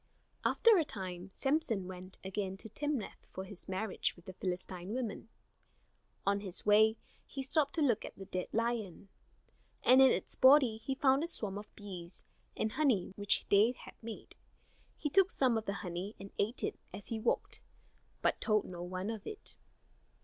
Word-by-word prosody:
After 455 -5 +5
a - - +3
time 185 -7 -6
Samson 270 -9 +1
went 185 0 -9
again 190 0 -3
to 210 - -6
Timnath 285 -2 -3
for 190 - -6
his 190 0 -10
marriage 190 +2 -1
with 175 - -18
the 185 - -7
Philistine 185 +2 -4
woman. 225 -3 -4 1.0
On 200 +1 +2
his 190 -3 -6
way 215 +2 +6 0.3
he 270 - -5
stopped 285 +1 +1
to 320 - +2
look 240 -7 +2
at - - -8
the 195 - -9
dead 185 -1 -3
lion; 225 -5 -2 0.7
and 255 +2 +7
in 265 - +9
its - - 0
body 260 -4 +6
he 265 +4 -3
found 270 +2 +4
a - - -1
swarm 205 - -2
of 210 - -13
bees, 185 -4 -8 0.3
and 220 - 0
honey 245 -12 +1
which 205 0 +2
they 210 +4 +5
had - - -12
made. 225 -1 -8 0.6
He - - -2
took 385 +2 +5
some 255 -8 +2
of 220 -1 -1
the 200 - 0
honey 180 +4 -4
and 195 +1 -9
ate 220 +5 0
it - - -2
as 195 +2 -8
he 225 - -2
walked, - - 0 0.6
but - - +2
told 215 -2 +2
no 175 -1 -7
one 185 +4 -3
of 220 -3 -7
it. 425 - -3
210 Hz, 180 wpm, -34 LUFS, 190-255 Hz, 1.0 s, in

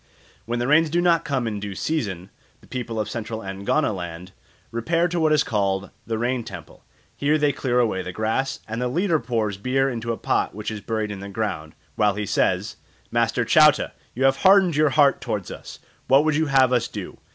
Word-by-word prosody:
When 120 +1 -1
the 120 +1 -1
rains 155 +2 +4
do 170 +3 +1
not 175 -1 +3
come 135 -6 -1
in 105 -2 -3
due 100 -1 -6
season 100 - -3 0.3
the - - -20
people 120 -3 -4
of 105 - -1
Central 115 -1 -5
Angoniland 95 - -2 0.4
repair 165 +10 +1
to 175 0 -2
what 160 -1 +3
is 150 -1 +4
called 100 -2 -1 0.2
the 115 -1 -1
rain 120 +1 -1
temple. - - -11 0.3
Here 150 +2 +2
they 145 -1 +2
clear 125 -3 -1
away 110 -6 +1
the 90 - -6
grass, 110 +7 -2
and 115 +2 -4
the 125 - 0
leader 170 +4 +1
pours 110 -6 -2
beer 135 +5 0
into 115 -1 -3
a 115 - -3
pot - - -1
which 105 +1 -4
is 110 -1 -6
buried 110 -1 -2
in 100 - -6
the 100 +1 -7
ground, 95 -7 -4 0.2
while 105 -2 +3
he 105 0 -3
says, - - 0 0.3
"Master - - +1
Chauta, - - +5 0.2
you 130 - -1
have 135 0 +4
hardened 190 -4 +5
your 150 0 +4
heart 140 0 +3
towards 100 -4 -4
us, - - -9 0.3
what 135 +3 +5
would 155 -1 +2
you 160 +1 +1
have 130 -2 +4
us 120 -2 +2
do? - - -8
120 Hz, 210 wpm, -23 LUFS, 105-145 Hz, 0.4 s, Chauta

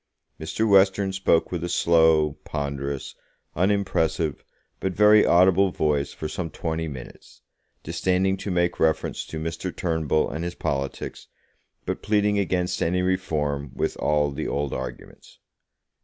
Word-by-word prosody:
Mr. 110 +8 -1
Western 95 -1 +4
spoke 95 -3 +2
with 85 -2 -3
a 85 - -3
slow, 80 -3 +3
ponderous, 70 -2 -4 0.4
unimpressive, 85 -5 0 0.4
but 95 -1 -2
very 105 +2 +6
audible 95 +2 +4
voice, 75 -4 0
for 80 - -5
some 80 +2 -4
twenty 80 0 -3
minutes, 65 -5 -11 0.4
disdaining 95 +1 +1
to 95 +1 -6
make 85 -1 0
reference 80 -1 0
to 80 - -6
Mr. 80 +3 -4
Turnbull 80 -4 0
and 80 +2 -4
his 85 0 -4
politics, 70 -1 -4 0.6
but - - -3
pleading 105 -1 +2
against 90 -2 -1
any 90 +2 +1
Reform, 75 -7 -1
with - - -1
all 75 -1 +1
the 75 +3 -4
old 70 -1 -2
arguments. 65 -1 -8
85 Hz, 135 wpm, -24 LUFS, 75-95 Hz, 0.6 s, very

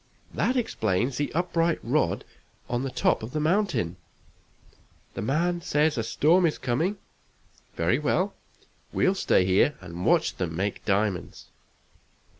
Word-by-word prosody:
That 255 - +1
explains 120 - 0
the 145 - -1
upright 170 -1 +1
rod - - 0 0.4
on 120 0 -1
the 135 - -2
top - - +1
of 110 +3 -7
the 155 - -1
mountain. 155 - 0 1.2
The - - -5
man 170 - 0
says 150 -2 +1
a 115 - 0
storm 160 +10 +3
is 155 - -2
coming 155 +11 -1 0.8
very 85 - +1
well; 185 +7 0 0.6
we'll 190 - +2
stay 95 - +2
here 95 +10 +3
and 90 -1 -7
watch - - +2
them 85 -3 -3
make 100 +3 -2
diamonds!" 100 -2 -1
135 Hz, 135 wpm, -26 LUFS, -, 1.2 s, storm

